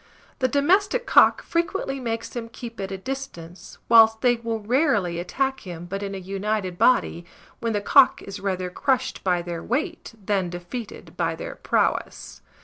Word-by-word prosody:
The 255 Hz, -, +2 dB
domestic 385 Hz, -, +2 dB
cock -, -, +5 dB
frequently 335 Hz, -5 st, -2 dB
makes 230 Hz, -2 st, -3 dB
them 230 Hz, -2 st, -6 dB
keep 230 Hz, -1 st, -9 dB
at 195 Hz, 0 st, -4 dB
a 195 Hz, -, -3 dB
distance, 190 Hz, -7 st, -8 dB
whilst 225 Hz, -1 st, +6 dB
they 245 Hz, -2 st, +3 dB
will 230 Hz, -1 st, -3 dB
rarely 210 Hz, -, +1 dB
attack 265 Hz, +9 st, -1 dB
him 175 Hz, -2 st, -8 dB
but 195 Hz, +3 st, -5 dB
in 200 Hz, -1 st, -4 dB
a -, -, -4 dB
united 195 Hz, 0 st, -3 dB
body, 225 Hz, -7 st, +3 dB, 0.4 s
when 230 Hz, -1 st, -1 dB
the 205 Hz, -, 0 dB
cock 270 Hz, +5 st, +5 dB
is 200 Hz, -, -7 dB
rather 185 Hz, -2 st, -2 dB
crushed 260 Hz, +5 st, -1 dB
by 180 Hz, -2 st, +1 dB
their 170 Hz, -1 st, -5 dB
weight 300 Hz, -, -3 dB
than 195 Hz, -3 st, -1 dB
defeated 180 Hz, +6 st, -8 dB
by -, -, 0 dB
their -, -, -6 dB
prowess. -, -, -1 dB
225 Hz, 165 wpm, -24 LUFS, 190-260 Hz, 0.4 s, whilst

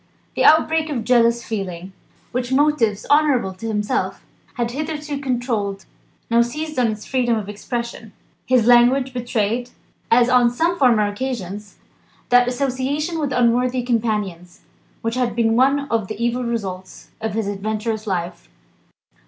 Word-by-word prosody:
The -, -, +1 dB
outbreak 315 Hz, 0 st, +4 dB
of 255 Hz, -6 st, -2 dB
jealous 235 Hz, -1 st, +3 dB
feeling, 190 Hz, -4 st, -5 dB, 0.4 s
which 250 Hz, 0 st, -3 dB
motives 260 Hz, -7 st, +2 dB
honourable 285 Hz, -10 st, +3 dB
to 190 Hz, +5 st, -7 dB
himself 215 Hz, +4 st, -2 dB, 0.3 s
had 240 Hz, -1 st, -2 dB
hitherto 300 Hz, +1 st, -4 dB
controlled, 235 Hz, -7 st, -2 dB, 0.4 s
now 235 Hz, 0 st, +4 dB
seized 305 Hz, +4 st, -3 dB
on 245 Hz, -, +3 dB
its 215 Hz, -1 st, -4 dB
freedom 245 Hz, -3 st, +1 dB
of 210 Hz, -2 st, -5 dB
expression. 235 Hz, +1 st, -5 dB, 0.4 s
His 250 Hz, -3 st, +3 dB
language 245 Hz, +2 st, +4 dB
betrayed 240 Hz, -1 st, -1 dB, 0.4 s
(as 240 Hz, +1 st, +5 dB
on 250 Hz, -1 st, +4 dB
some 335 Hz, +8 st, 0 dB
former 235 Hz, -6 st, +4 dB
occasions) 205 Hz, -3 st, -5 dB, 0.5 s
that 245 Hz, 0 st, +5 dB
association 275 Hz, +5 st, -1 dB
with 290 Hz, -3 st, -1 dB
unworthy 250 Hz, +1 st, +2 dB
companions, 210 Hz, -7 st, -2 dB, 0.4 s
which 230 Hz, 0 st, -1 dB
had 245 Hz, -3 st, -1 dB
been 225 Hz, -1 st, +2 dB
one 275 Hz, +3 st, +3 dB
of 225 Hz, -4 st, 0 dB
the 215 Hz, -, -5 dB
evil 240 Hz, +1 st, 0 dB
results 190 Hz, -6 st, -5 dB
of 220 Hz, -2 st, -3 dB
his 220 Hz, -2 st, -1 dB
adventurous 215 Hz, +2 st, -3 dB
life. 175 Hz, -2 st, -4 dB
235 Hz, 140 wpm, -21 LUFS, 215-255 Hz, 0.5 s, as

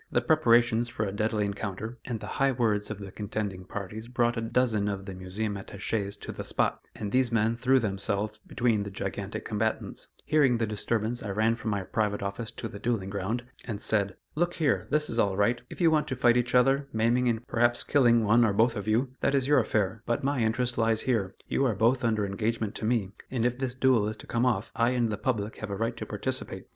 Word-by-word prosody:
The -, -, +3 dB
preparations 120 Hz, -6 st, +3 dB
for 115 Hz, -3 st, -2 dB
a 100 Hz, -, -3 dB
deadly 105 Hz, +1 st, 0 dB
encounter, 100 Hz, +3 st, -4 dB
and 120 Hz, -3 st, -3 dB
the -, -, -7 dB, 0.2 s
high 135 Hz, 0 st, +5 dB
words 110 Hz, -4 st, +1 dB
of 105 Hz, -, -4 dB
the 100 Hz, -1 st, -8 dB
contending 100 Hz, -2 st, -4 dB
parties 105 Hz, +4 st, -6 dB
brought 120 Hz, -1 st, +1 dB
a 115 Hz, -, -2 dB
dozen 115 Hz, -3 st, +1 dB
of 100 Hz, -1 st, -3 dB
the 95 Hz, -, -6 dB
Museum 95 Hz, +3 st, -4 dB
attaches 100 Hz, +1 st, -3 dB
to -, -, -5 dB
the -, -, -6 dB
spot, -, -, -1 dB
and 105 Hz, -1 st, -4 dB
these 130 Hz, -2 st, +2 dB
men 115 Hz, 0 st, +2 dB
threw 130 Hz, +2 st, +3 dB
themselves 105 Hz, 0 st, -2 dB
between 115 Hz, -1 st, 0 dB
the 100 Hz, -, -4 dB
gigantic 100 Hz, +1 st, -4 dB
combatants. 110 Hz, 0 st, -2 dB, 0.2 s
Hearing 145 Hz, -5 st, +4 dB
the 115 Hz, -, +1 dB
disturbance, 110 Hz, +2 st, -2 dB
I 105 Hz, -, -5 dB
ran 110 Hz, +3 st, +2 dB
from 115 Hz, -1 st, -4 dB
my 100 Hz, -2 st, -1 dB
private 105 Hz, 0 st, -1 dB
office 100 Hz, +3 st, -4 dB
to 115 Hz, -, -6 dB
the 100 Hz, -, -9 dB
duelling 105 Hz, -4 st, -1 dB
ground, 105 Hz, +5 st, -2 dB, 0.2 s
and 105 Hz, -4 st, -4 dB
said: 100 Hz, -3 st, +1 dB, 0.2 s
"Look 175 Hz, +2 st, 0 dB
here! 150 Hz, -6 st, +1 dB
This 150 Hz, 0 st, +1 dB
is 115 Hz, -, -2 dB
all 100 Hz, -3 st, +2 dB
right; 120 Hz, +4 st, +2 dB
if -, -, -10 dB
you 170 Hz, -3 st, +5 dB
want 155 Hz, -1 st, +2 dB
to 130 Hz, -, -2 dB
fight 120 Hz, -1 st, +4 dB
each 125 Hz, +1 st, +1 dB
other, 135 Hz, +3 st, +4 dB
maiming 120 Hz, +3 st, +2 dB
and 115 Hz, 0 st, 0 dB
perhaps 120 Hz, 0 st, +2 dB
killing 120 Hz, -5 st, +4 dB
one 110 Hz, +3 st, +5 dB
or 110 Hz, -3 st, +3 dB
both 115 Hz, +3 st, +3 dB
of 105 Hz, -1 st, -5 dB
you, 120 Hz, +4 st, +1 dB
that 140 Hz, -, +1 dB
is 135 Hz, -1 st, +1 dB
your 145 Hz, -1 st, +5 dB
affair; 110 Hz, -2 st, 0 dB
but 120 Hz, -, 0 dB
my 140 Hz, 0 st, +1 dB
interest 120 Hz, +2 st, 0 dB
lies 115 Hz, -1 st, +2 dB
here 110 Hz, -7 st, 0 dB
you -, -, +1 dB
are 125 Hz, -6 st, +2 dB
both 120 Hz, +6 st, +2 dB
under 110 Hz, -3 st, +1 dB
engagement 110 Hz, +2 st, -2 dB
to -, -, -4 dB
me, 110 Hz, -4 st, +1 dB, 0.2 s
and 120 Hz, -3 st, -1 dB
if 125 Hz, +1 st, 0 dB
this 130 Hz, -2 st, -2 dB
duel 130 Hz, -5 st, +3 dB
is 110 Hz, -, -5 dB
to -, -, -10 dB
come 120 Hz, +2 st, +1 dB
off, 115 Hz, -3 st, 0 dB
I 120 Hz, +2 st, +2 dB
and 115 Hz, -2 st, +1 dB
the 105 Hz, -, -2 dB
public 110 Hz, -4 st, -1 dB
have 110 Hz, -, -6 dB
a 100 Hz, -, -2 dB
right 115 Hz, +3 st, -1 dB
to -, -, -6 dB
participate. -, -, -3 dB
115 Hz, 230 wpm, -28 LUFS, 105-125 Hz, 0.2 s, high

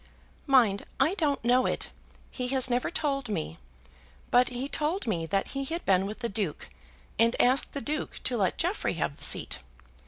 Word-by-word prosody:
"Mind, 235 Hz, -8 st, +4 dB
I 290 Hz, +7 st, +3 dB
don't 290 Hz, -, 0 dB
know 250 Hz, +1 st, +4 dB
it. -, -, -2 dB, 0.4 s
He 250 Hz, -2 st, -3 dB
has 260 Hz, -1 st, +4 dB
never 245 Hz, +1 st, +1 dB
told 275 Hz, -7 st, -1 dB
me. 80 Hz, -, -3 dB, 0.7 s
But 245 Hz, 0 st, +5 dB
he 250 Hz, +2 st, -4 dB
told 305 Hz, +5 st, -1 dB
me 170 Hz, -8 st, -1 dB
that 195 Hz, +3 st, 0 dB
he 275 Hz, 0 st, -3 dB
had 335 Hz, +5 st, -4 dB
been 190 Hz, 0 st, +3 dB
with 215 Hz, +4 st, -7 dB
the 235 Hz, -, 0 dB
Duke, 200 Hz, -7 st, -3 dB, 0.5 s
and 230 Hz, +1 st, +3 dB
asked 255 Hz, +3 st, +2 dB
the 280 Hz, -, -3 dB
Duke 300 Hz, +2 st, -3 dB
to 250 Hz, -, 0 dB
let 195 Hz, -5 st, +1 dB
Jeffrey -, -, 0 dB
have -, -, -2 dB
the -, -, -4 dB
seat. -, -, +1 dB
250 Hz, 185 wpm, -28 LUFS, 210-275 Hz, 0.7 s, But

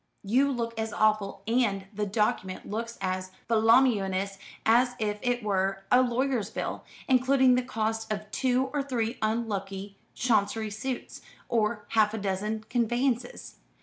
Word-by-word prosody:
You 260 Hz, +8 st, +3 dB
look 230 Hz, -3 st, -3 dB
as 220 Hz, -1 st, -2 dB
awful, 215 Hz, -2 st, +1 dB
and 220 Hz, -4 st, +1 dB
the 210 Hz, 0 st, -2 dB
document 195 Hz, -2 st, -1 dB
looks 230 Hz, +2 st, -4 dB
as 185 Hz, 0 st, -2 dB, 0.2 s
voluminous, 215 Hz, -4 st, +3 dB, 0.3 s
as 245 Hz, +2 st, +4 dB
if 210 Hz, -2 st, -2 dB
it 245 Hz, -2 st, 0 dB
were 195 Hz, -1 st, 0 dB
a 250 Hz, -, +7 dB
lawyer's 250 Hz, -3 st, 0 dB
bill, -, -, -4 dB, 0.2 s
including 260 Hz, 0 st, +4 dB
the 250 Hz, -, +3 dB
costs 225 Hz, -2 st, -2 dB
of 215 Hz, 0 st, -4 dB
two 260 Hz, +1 st, +1 dB
or 290 Hz, -, +1 dB
three 240 Hz, -4 st, -2 dB
unlucky 200 Hz, -3 st, -2 dB, 0.2 s
Chancery 220 Hz, -2 st, +1 dB
suits, 245 Hz, +4 st, -5 dB, 0.3 s
or 215 Hz, -2 st, 0 dB
half 215 Hz, -1 st, +3 dB
a -, -, -3 dB
dozen 205 Hz, +2 st, -2 dB
conveyances. 245 Hz, +1 st, -1 dB
220 Hz, 140 wpm, -28 LUFS, 205-245 Hz, 0.3 s, a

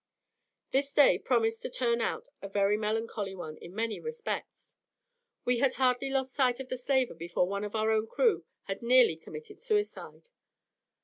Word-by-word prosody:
This 275 Hz, +1 st, +1 dB
day 285 Hz, 0 st, +6 dB
promised 225 Hz, -2 st, +1 dB
to -, -, -4 dB
turn 235 Hz, -2 st, 0 dB
out -, -, -2 dB
a 195 Hz, -, -6 dB
very 200 Hz, +1 st, +2 dB
melancholy 215 Hz, -2 st, -2 dB
one 155 Hz, -4 st, -7 dB
in 175 Hz, -, -12 dB
many 225 Hz, 0 st, -2 dB
respects. 470 Hz, 0 st, -6 dB, 0.7 s
We 245 Hz, -1 st, +2 dB
had 265 Hz, 0 st, +3 dB
hardly 255 Hz, +1 st, +2 dB
lost 265 Hz, -1 st, -1 dB
sight 255 Hz, -3 st, +2 dB
of 265 Hz, -1 st, -7 dB
the 255 Hz, -, -2 dB
slaver 260 Hz, -1 st, +1 dB
before 170 Hz, +2 st, -1 dB
one 200 Hz, +1 st, -3 dB
of 210 Hz, +1 st, -5 dB
our 220 Hz, 0 st, +2 dB
own 220 Hz, 0 st, +1 dB
crew 470 Hz, -, +2 dB, 0.2 s
had 195 Hz, 0 st, -5 dB
nearly 240 Hz, -6 st, +5 dB
committed 155 Hz, -1 st, -10 dB
suicide. 430 Hz, +1 st, -2 dB
235 Hz, 170 wpm, -30 LUFS, 205-265 Hz, 0.7 s, day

